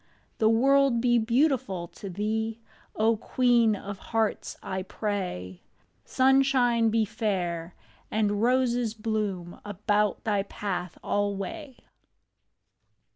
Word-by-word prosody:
The 220 - +4
world 270 +2 +4
be 240 0 +3
beautiful 230 - +1
to 200 - -9
thee, 220 +4 -2 0.4
O 220 +1 +2
queen 240 -1 +3
of 200 0 -7
hearts, 225 -2 -2
I 190 0 -3
pray! 185 - -4 0.4
Sunshine 260 -3 +3
be 220 0 +2
fair, 180 -5 -2 0.3
and 205 -1 0
roses 245 -2 +1
bloom 210 -6 -3
About 205 0 0
thy 205 -2 +1
path 185 -3 -4
alway. 205 +8 -3
215 Hz, 100 wpm, -27 LUFS, 200-240 Hz, 0.4 s, The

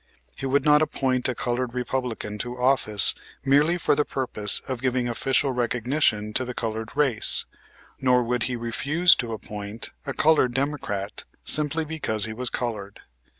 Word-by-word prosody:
He 135 - -4
would 135 +1 +1
not 150 0 +6
appoint 130 -4 0
a 125 - -2
colored 120 0 -2
Republican 125 -4 -3
to 120 +3 -4
office 125 -6 +3 0.3
merely 150 +6 +4
for - - +2
the 150 +1 +2
purpose 120 -8 0
of 130 -3 -4
giving 125 -2 0
official 135 +3 +1
recognition 120 -2 0
to 130 - +1
the 125 -1 -6
colored 110 -1 -3
race, 130 -7 +3 0.5
nor 125 -1 +3
would 125 +1 -1
he 125 - -2
refuse 140 +9 +3
to 120 -2 -3
appoint 105 0 -6 0.2
a 140 - -2
colored 150 -6 +3
Democrat 130 -8 -3 0.2
simply 155 +1 +1
because 150 -9 -1
he 110 - -5
was 125 +2 -1
colored. 105 -5 -4
125 Hz, 155 wpm, -25 LUFS, 115-135 Hz, 0.5 s, not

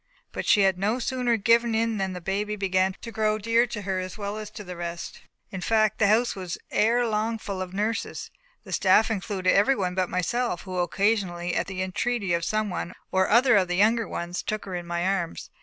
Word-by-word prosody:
But - - -5
she 210 - +5
had 190 -2 +3
no 210 +5 +1
sooner 250 -2 0
given 230 +2 +3
in 225 -1 0
than 190 -1 -1
the 180 - -7
baby 205 +4 -2
began 190 -1 +1
to 230 - -7
grow 215 -1 +1
dear 230 +3 +2
to 210 -3 -6
her 190 -1 -1
as 185 +1 -6
well 205 0 -4
as 215 -1 -7
to 210 0 -9
the 180 -2 -8
rest. 170 0 -6 0.3
In 190 - -5
fact, 215 +1 +2
the 215 - +4
house 230 +4 +3
was 185 -3 -5
ere 235 +3 +3
long 220 +1 0
full 200 -3 -5
of 185 -1 -5
nurses. 210 +4 -3 0.3
The - - -11
staff 205 +4 +4
included 195 -3 0
everyone 200 -4 +2
but 185 -1 0
myself, 185 +2 -1
who 190 - -9
only 180 -1 +1
occasionally, 180 -2 0
at - - -1
the 185 -1 -3
entreaty 195 +1 -1
of 170 0 0
some 215 +2 -1
one 180 0 -4 0.2
or 190 0 +2
other 245 +2 +5
of 190 -2 +3
the 180 - -1
younger 220 +4 +3
ones, 175 +1 -4
took 215 0 -4
her 190 - -6
in 175 -1 -4
my 170 +1 -1
arms. 190 -3 -2
200 Hz, 225 wpm, -26 LUFS, 185-220 Hz, 0.3 s, she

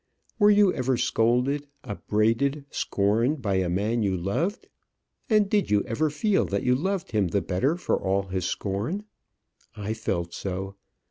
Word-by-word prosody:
Were 205 -1 +6
you 205 -2 +5
ever 130 -1 0
scolded, 125 +5 +1 0.2
upbraided, 115 +6 0
scorned 115 +9 +1
by 100 -3 +1
a 95 -2 0
man 105 +6 0
you 95 -3 +1
loved? 150 - -2 0.6
and 215 -2 +4
did 205 0 +1
you 105 -1 +3
ever 150 +8 0
feel 190 +7 +1
that 100 0 -2
you 125 - +3
loved 185 +6 -1
him 105 -4 +2
the 100 +3 0
better 115 - +1
for 180 - -1
all 95 +1 +1
his 95 -2 -3
scorn? 105 - -2 0.7
I 105 +1 -3
felt 85 -6 -3
so. 95 +1 -4
115 Hz, 155 wpm, -26 LUFS, 100-150 Hz, 0.7 s, Were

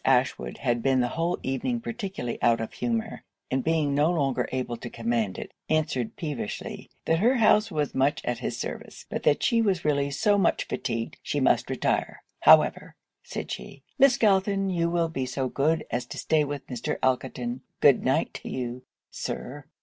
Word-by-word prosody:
Ashwood 130 -1 +1
had 120 -3 0
been 135 0 +2
the 125 -1 +1
whole 170 +2 0
evening 185 - -1
particularly 200 - -5
out 115 -1 +4
of 115 - -5
humour, 225 -2 -2 0.3
and 130 0 0
being 155 -3 +1
no 145 +3 +3
longer 135 -7 0
able 130 -2 -2
to 120 - -7
command 115 -4 -1
it, - - -7 0.2
answered 155 -7 0
peevishly, 145 -10 -5 0.2
'that 165 0 +2
her 240 +7 +4
house 220 -2 +4
was 150 -5 -1
much 140 +2 +1
at 120 -1 -1
his - - -3
service, - - -6
but - - -2
that 145 - +2
she 235 -1 +3
was 195 -7 0
really 140 -2 +2
so 205 +8 +2
much - - +2
fatigued - - -3
she - - -2
must - - +2
retire - - -1 0.2
however,' - - +5 0.3
said - - -6
she, - - -7 0.2
'Miss 270 -2 +6
Galton, 195 -2 +2
you 170 -1 +1
will 170 -1 +1
be 135 -5 -3
so 130 +1 -2
good 155 +5 +1
as 120 - -2
to - - -8
stay 155 -1 +2
with 145 -1 -5
Mr. 125 -3 -3
Elkerton 125 -1 -1 0.2
good 140 -3 +5
night 135 +5 +1
to - - -7
you, 125 -1 -4 0.3
Sir!' 140 +2 -5
145 Hz, 180 wpm, -27 LUFS, 130-180 Hz, 0.3 s, Miss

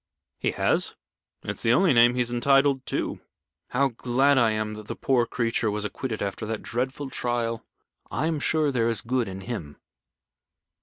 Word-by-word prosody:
"He - - 0
has. - - +1 0.5
It's - - -4
the 115 - +3
only 180 +2 +4
name 120 0 +6
he 125 - +1
is 120 0 -1
entitled 135 +2 +3
to. - - -2 0.5
How 135 +2 +1
glad 130 +3 +2
I 115 -2 +4
am 110 0 -2
that 105 0 -9
the - - -4
poor 125 -3 +1
creature 115 -2 0
was 105 0 -2
acquitted 110 +2 -3
after 100 +2 -4
that 110 -1 -4
dreadful 130 +3 -3
trial. 115 -2 -2 0.5
I 130 - -1
am 160 -2 0
sure 155 0 +1
there 115 -3 +1
is 115 - -1
good 125 0 0
in 95 0 -6
him." 90 -10 -6
120 Hz, 175 wpm, -26 LUFS, 110-135 Hz, 0.5 s, name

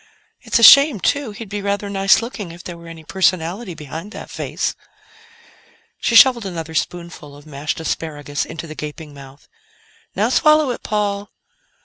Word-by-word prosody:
"It's - - 0
a 230 - +1
shame, 280 -2 +8
too; 285 +5 0
he'd 215 +1 -9
be 205 +1 -5
rather 200 +1 -2
nice 195 +2 +3
looking 215 -7 -7
if 175 +1 -12
there 175 - -7
were 170 0 -13
any 165 -1 -11
personality 185 +2 -1
behind 160 +7 -8
that - - -9
face." - - -3 1.3
She 235 - 0
shoveled 235 -4 +6
another 165 -3 -6
spoonful 170 -3 -5
of 145 - -16
mashed 150 +1 -4
asparagus 145 -3 -3
into 165 +1 -7
the 155 - -8
gaping 150 0 -8
mouth. 140 0 -14 0.7
"Now - - +1
swallow 305 -3 +4
it, - - -6
Paul." 205 -1 -2
175 Hz, 160 wpm, -19 LUFS, 160-210 Hz, 1.3 s, shame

